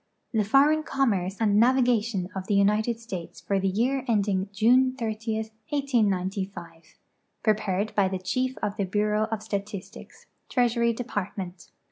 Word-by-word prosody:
The 220 -2 +2
Foreign 280 +8 +4
Commerce 205 - 0
and 210 -1 +3
Navigatiem 235 -7 +2
of 190 0 -5
the 210 - +1
United 210 +3 +2
States 190 -8 -7
for 200 -1 -1
the 195 - 0
Year 245 +7 0
endinn 200 -4 +1
June 250 +5 +4
30, 225 -2 -3 0.3
1895. 195 - -2 0.5
Prepared 215 -1 0
by 200 -2 +3
the 190 0 -2
Chief 255 +8 -2
of 205 +1 -2
the 200 - 0
Bureau 210 +2 +1
of 220 -1 -4
Statistics, 200 -1 -6 0.2
Treasury 235 -2 +2
Department. 200 -6 -5
215 Hz, 135 wpm, -26 LUFS, 195-235 Hz, 0.5 s, Foreign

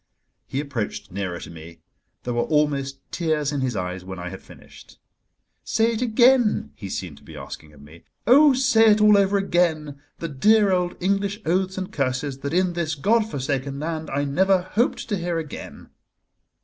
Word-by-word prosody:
He 135 - -3
approached 135 -11 -4
nearer 95 -2 -4
to - - -9
me; 80 0 -11 0.5
there 125 - -3
were 120 - +1
almost 145 -3 0
tears 155 -4 -1
in 145 -2 -2
his 125 -3 -1
eyes 90 -1 -4
when 95 0 -8
I 90 0 -6
had 95 - -9
finished. - - -16 0.7
"Say 225 +1 +1
it 225 - -3
again!" 245 -1 +3
he 100 - -8
seemed 85 -6 -5
to - - -23
be 75 +1 -12
asking 75 +2 -9
of 70 -1 -16
me. 80 +3 -16 0.2
"Oh! 285 +5 +7
say 230 -4 +4
it 210 0 +4
all 210 0 +6
over 200 0 +3
again, 160 -7 0 0.2
the 165 - -4
dear 205 +8 +3
old 180 -1 0
English 200 +2 0
oaths 185 +3 0
and 190 +1 -4
curses 135 -2 -2
that 140 - -4
in 180 +1 +1
this 165 -3 -2
God 220 +9 +1
forsaken 140 -2 -3
land 160 0 -4
I 140 +1 -1
never 185 +6 +2
hoped 225 +6 -1
to 205 - 0
hear 175 -1 -2
again." 160 -3 -8
155 Hz, 185 wpm, -23 LUFS, 130-195 Hz, 0.7 s, Oh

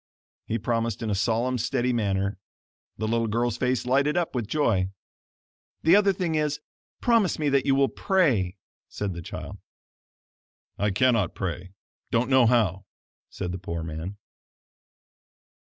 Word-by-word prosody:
He 115 - 0
promised 115 0 -1
in 110 - -1
a - - +2
solemn, 115 +5 0
steady 125 +1 0
manner. 100 -3 -1 0.6
The 110 - -2
little 115 0 +1
girl's 115 +1 0
face 125 -1 0
lighted 140 +5 +2
up 175 -2 0
with 120 -5 -2
joy. 110 -9 +1 0.9
"The 165 +4 +6
other 200 -1 +5
thing 180 -3 -2
is, 150 -1 0 0.4
promise 230 -7 +3
me 150 -2 +1
that 140 -1 +2
you 135 - +4
will 135 0 +4
PRAY," 125 - +1 0.3
said 100 -2 -3
the 85 - -6
child. - - -7 1.2
"I 105 +1 +2
cannot 115 -3 +2
pray; 90 0 -4 0.4
don't 120 +3 +1
know 130 -3 +6
how," 100 -5 +2 0.4
said 90 -2 -4
the 90 - -5
poor 85 -2 -4
man. 80 +5 -6
115 Hz, 145 wpm, -26 LUFS, 100-135 Hz, 1.2 s, The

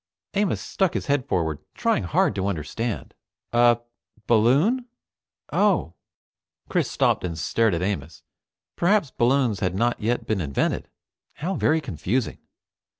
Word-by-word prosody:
Amos 205 -1 +1
stuck 190 -4 0
his - - -2
head 140 -2 0
forward, 80 - 0 0.2
trying - - +1
hard - - +2
to 95 0 -1
understand. 100 +6 -3 0.4
"A 120 0 +5 0.4
balloon. 140 - +3 0.7
Oh." 190 - +2 0.8
Chris - - +1
stopped - - +1
and 85 -3 -3
stared 110 +4 +1
at 85 - -2
Amos. 85 -6 -3 0.5
Perhaps 175 -5 +2
balloons 125 -4 +2
had 95 -1 -1
not 120 +3 0
yet 120 +3 0
been 105 -4 0
invented. 70 -4 -1 0.4
How 175 +6 -3
very 160 -3 +2
confusing! 115 - -2
120 Hz, 130 wpm, -24 LUFS, 95-145 Hz, 0.8 s, A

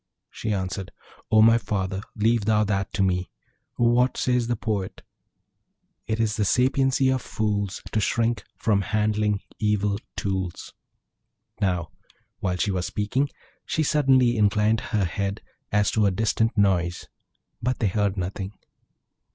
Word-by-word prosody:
She 110 - -4
answered, 95 -1 -3 0.4
'O 110 0 +6
my 115 +1 +6
father! 95 -3 -2
leave 110 0 +2
thou 105 -1 +3
that 100 -2 -1
to 100 - +1
me. 90 -1 0 0.5
What 120 +2 +3
says 125 -2 +1
the 120 - 0
poet? 105 -4 -3 1.0
"It 110 +1 -1
is 110 -2 0
the 110 - +1
sapiency 130 +4 +2
of 130 - -1
fools, 100 -4 -2
To 110 - +1
shrink 115 +3 0
from 105 -3 +2
handling 105 0 0 0.2
evil 105 -1 +1 0.2
tools."' 95 -3 -3 0.9
Now, 90 -4 0 0.5
while 90 -1 -1
she 100 - 0
was 90 -2 -1
speaking, 130 +7 -1 0.3
she 160 - -1
suddenly 130 -5 +3
inclined 105 +1 +3
her 105 -5 +1
ear 100 0 0 0.4
as 105 0 +2
to 105 -2 +3
a - - +4
distant 110 +3 0
noise; 90 -4 +1 0.5
but 125 +2 0
they 110 - +1
heard 100 0 0
nothing. 95 +2 -4
105 Hz, 140 wpm, -25 LUFS, 100-115 Hz, 1.0 s, O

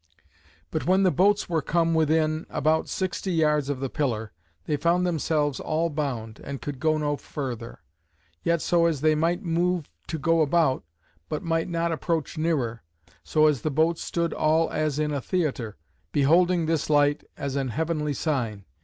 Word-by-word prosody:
But - - -2
when 190 +2 +4
the 185 - +4
boats 200 +4 +3
were 165 -3 0
come 165 +2 +1
within 155 0 +1
(about) 155 +2 +1
sixty 185 0 -2
yards 150 -3 +2
of 140 -3 -2
the 135 - -2
pillar, 115 -7 -2 0.3
they 150 - 0
found 170 +4 +2
themselves 150 -4 0
all 165 +2 -1
bound, 125 -7 -4
and 140 -1 -5
could 145 -3 -6
go 155 +1 +2
no 145 -1 0
further; 120 - -6 0.6
yet 170 -1 +1
so 170 -1 +3
as 155 -5 -1
they 155 0 +4
might 170 +5 0
move 175 - 0 0.2
to 160 - -3
go 165 +2 +2
about, 155 -3 +2 0.5
but 155 - -3
might 165 +1 0
not 170 0 0
approach 160 0 -2
nearer: 145 -8 -1 0.4
so 155 -1 +3
as 150 -6 +3
the 155 - -1
boats 160 +3 +1
stood 170 -1 -1
all 160 +1 +2
as 155 -2 -1
in 150 0 0
a 140 -2 -2
theatre, 135 - -2 0.3
beholding 170 - +3
this 160 -2 0
light 145 -1 +3
as 140 -1 -3
an 135 -1 0
heavenly 150 +3 -1
sign. 115 - -2
155 Hz, 170 wpm, -26 LUFS, 140-165 Hz, 0.6 s, when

